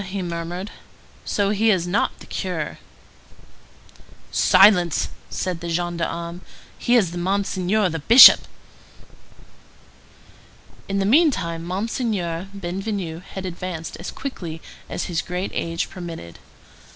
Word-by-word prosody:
he 190 0 -5
murmured. 175 +3 -5 0.5
"So 200 -1 0
he 215 +2 +2
is 185 -5 +2
not 180 +4 0
the - - -11
curé?" - - -4 1.5
"Silence!" 185 -4 +4 0.2
said 180 -3 -3
the 170 - -6
gendarme. 170 0 -3 0.4
"He 240 - +2
is 185 -8 +2
Monseigneur 195 +2 0
the 165 -2 -3
Bishop." 230 - +9 2.4
In 195 - -1
the 195 - +1
meantime, 195 - +2
Monseigneur 185 -2 -2
Bienvenu 190 -2 -4
had 190 0 -8
advanced 175 -2 -6
as 175 - -6
quickly 175 -12 -6 0.3
as - - -3
his 170 -3 -2
great 180 +2 -4
age 165 0 -2
permitted. 165 - -9
180 Hz, 110 wpm, -22 LUFS, 170-200 Hz, 2.4 s, Bishop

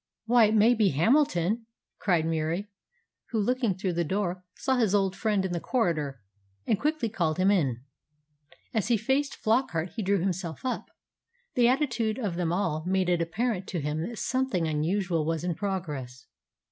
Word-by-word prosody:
"Why, 235 0 +6
it 215 +1 +2
may 220 +3 +6
be 220 -4 +3
Hamilton!" 220 - +2 0.3
cried 175 -5 +2
Murie; 165 +5 -1 0.6
who, 225 - -1
looking 235 -2 +1
through 190 -1 -2
the 170 0 +1
door, 185 +1 -2
saw 265 -1 0
his 215 -5 +2
old 195 -2 +1
friend 200 -1 0
in 190 - -2
the 175 - -1
corridor, 155 - -1 0.4
and 210 - +1
quickly 300 -4 0
called 170 -8 -1
him 190 +2 +4
in. 135 - +1 0.9
As 220 -4 0
he 235 -1 +3
faced 270 +6 0
Flockart 215 -7 0
he 230 - -2
drew 200 0 +2
himself 175 +1 -3
up. 255 - -2 0.6
The 240 -1 +4
attitude 240 -5 +1
of 210 -8 -2
them 170 -2 -1
all 170 -4 0
made 190 -1 +1
it 175 -1 +2
apparent 195 +3 -1
to 175 - -3
him 155 +4 -2
that 235 - -8
something 255 -10 0
unusual 165 +2 0
was 160 +1 -1
in 175 -1 0
progress. 150 -10 -4
190 Hz, 170 wpm, -28 LUFS, 165-225 Hz, 0.9 s, Why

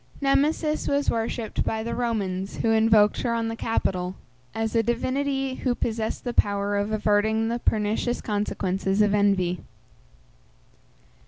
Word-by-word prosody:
Nemesis 300 +2 +1
was 280 0 +1
worshipped 225 0 -2
by 220 0 -2
the 235 - -3
Romans, 200 -6 -2
(who 225 - +3
invoked 220 -1 +4
her 235 -2 0
on 230 -1 -1
the 225 - -4
Capitol), 185 -5 -1 0.4
as 225 0 -1
a 230 - +4
divinity 270 +3 -1
who 255 -1 -1
possessed 220 -2 -2
the 245 - -3
power 205 -1 +1
of 205 +1 -1
averting 215 +1 +1
the 235 +1 -1
pernicious 220 +2 0
consequences 195 -1 0
of 205 -1 +2
envy. 195 -4 +2
220 Hz, 140 wpm, -25 LUFS, 205-240 Hz, 0.4 s, invoked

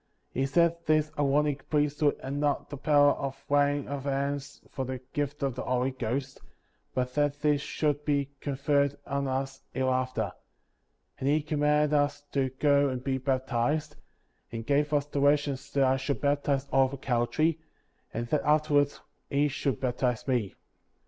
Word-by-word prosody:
He 135 +1 0
said 170 +3 +3
this 155 0 +3
Aaronic 145 0 +1
Priesthood 150 -1 +1
had 135 +1 -4
not 145 0 -1
the - - -4
power 145 0 +5
of 135 -1 -5
laying 145 0 +2
on 140 0 -4
hands 140 +1 -2
for 135 - -3
the 130 0 -4 0.2
gift 145 0 -2
of 135 -2 0
the - - -5
Holy 125 +1 0
Ghost, 130 +2 -3 0.5
but 125 -1 -1
that 145 0 0
this 150 -2 +2
should 150 -1 -1
be 140 -2 0
conferred 140 0 +1
on 140 0 -1
us 135 0 -3
here 130 +1 +1
after; 130 -6 -1 0.9
and 135 - 0
he 150 +1 +2
comihanded 150 0 +2
us 145 0 +1
to 135 -2 +1
go 140 +1 +3
and 130 -1 -4
be 130 -1 -1
baptized, 135 +3 0 0.6
and 115 -1 -5
gave 145 +2 +2
us 145 -1 +2
directions 145 -1 +1
that 140 - +3
I 130 0 +3
should 135 +1 -2
baptize 140 -1 0
Oliver 135 0 +3
Cowdery, 135 +6 +1 0.5
and 115 +1 -3
that 150 - +2
afterwards 150 -1 +2 0.3
he 145 +1 +2
should 140 -1 -2
baptize 125 -2 -1
me. 120 -8 0
140 Hz, 160 wpm, -28 LUFS, 130-145 Hz, 0.9 s, power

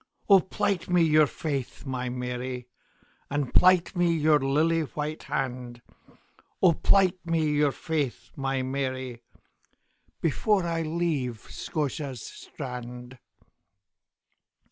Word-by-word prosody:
O 195 -2 +8
plight 190 -1 -1
me 180 -1 +4
your 155 -1 +5
faith, 140 -4 -4
my 125 -2 -3
Mary, 125 0 -4 0.6
And 145 -2 -2
plight 185 0 +5
me 175 -1 +3
your 155 -2 +4
lily 155 +5 +2
white 150 +1 -4
hand;O 125 +6 -3
plight 185 +2 +3
me 165 -2 +1
your 145 -1 +3
faith, 145 -1 -3
my 135 -1 -1
Mary, 130 -2 -3 1.0
Before 185 +4 +1
I 165 -1 -1
leave 155 -8 -1
Scotia's 140 -5 -3
strand. 125 -2 -8
145 Hz, 100 wpm, -27 LUFS, 130-165 Hz, 1.0 s, O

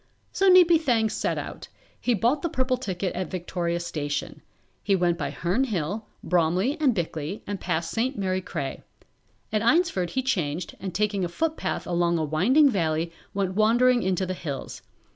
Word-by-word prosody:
So 390 0 +3
Neepy 350 -3 +7
Thang 230 -7 +2
set - - -1
out. - - -6 0.3
He 245 - +1
bought 240 +8 +1
the 340 - -1
purple 260 -2 0
ticket 190 -6 -3
at 185 -2 -3
Victoria 175 -1 -2
Station. 145 -4 -4 0.4
He 200 - +2
went 175 -2 +2
by 150 -4 -3
Herne 185 - 0
Hill, 205 - -3 0.2
Bromley 180 - +2
and 265 -6 +3
Bickley 165 +1 -3
and 200 -1 -5
passed 165 +1 -1
St. 255 +4 -1
Mary 185 -1 -1
Cray. 135 -6 -5 0.7
At 215 - +2
Eynsford 235 - +2
he 260 - -1
changed 175 - -2
and 185 -2 -6
taking 205 -1 0
a 175 - -1
footpath 320 - -2
along 170 -1 +1
a 160 - 0
winding 225 - +4
valley 165 -4 0 0.2
went 195 -2 0
wandering 240 +4 +4
into 190 -1 0
the 185 - -3
hills. 145 -7 -6
190 Hz, 170 wpm, -26 LUFS, 170-245 Hz, 0.7 s, Neepy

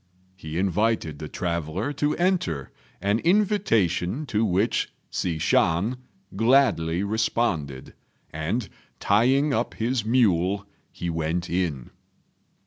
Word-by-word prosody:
He 80 -3 -6
invited 95 -4 0
the 75 - -5
traveller 85 - -2
to 145 +1 0
enter, 170 - 0 0.3
an 100 +3 +1
invitation 155 - +1
to 110 -4 0
which 100 +2 +1 0.2
Hsi 85 -3 -1
Shan 85 +9 +2 0.4
gladly 100 -8 +3
responded; 100 - -1 0.4
and, 90 +9 -2 0.3
tying 130 +8 +3
up 115 +1 -1
his 120 +1 -1
mule, 100 -4 +2 0.3
he 85 - -4
went 80 +2 -2
in. 85 -8 -2
100 Hz, 105 wpm, -25 LUFS, 85-120 Hz, 0.4 s, gladly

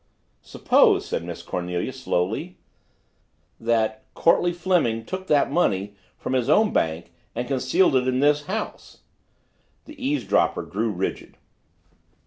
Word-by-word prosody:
"Suppose," - - +3
said - - -3
Miss - - -7
Cornelia 90 +6 -3
slowly, 130 - -2 1.0
"that 110 -1 0
Courtleigh 175 +1 +3
Fleming 170 -11 0
took 185 +5 -6
that 145 -2 +3
money 100 - 0 0.2
from - - -4
his 130 0 0
own 210 +7 +4
bank 80 +1 -1 0.2
and 120 - -3
concealed 135 +5 +2
it 130 0 +2
in 130 0 +1
this 145 +1 +2
house?" 215 +3 -5 0.8
The 300 -3 -11
eavesdropper 285 +2 +1
grew - - -2
rigid. - - -4
130 Hz, 120 wpm, -24 LUFS, 110-175 Hz, 1.0 s, own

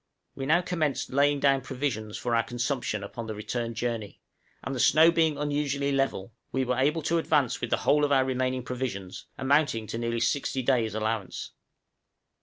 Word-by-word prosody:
We 135 -1 -5
now 165 +4 +4
commenced 160 -6 -1
laying 145 +1 +3
down 135 -1 +3
provisions 125 -6 -3
for 120 -1 -1
our 115 - +4
consumption 120 -2 -2
upon 110 +3 -7
the 110 - -4
return 115 +2 -4
journey; 115 -3 -3 0.4
and 130 - -4
the 130 - -3
snow 160 +6 +6
being 160 -3 +2
unusually 145 -1 -1
level, 135 -6 -1 0.2
we 130 0 0
were 125 0 0
able 150 +4 +1
to 165 +2 +1
advance 145 -6 +1
with - - -2
the - - +2
whole 150 +1 +4
of 145 - +2
our 135 -2 +4
remaining 130 -1 -1
provisions, 120 -8 -5
amounting 135 -4 +2
to 110 +2 -5
nearly 115 0 -1
sixty 135 +1 0
days' 120 -5 +1
allowance. 110 -2 -3
130 Hz, 180 wpm, -27 LUFS, 115-145 Hz, 0.4 s, snow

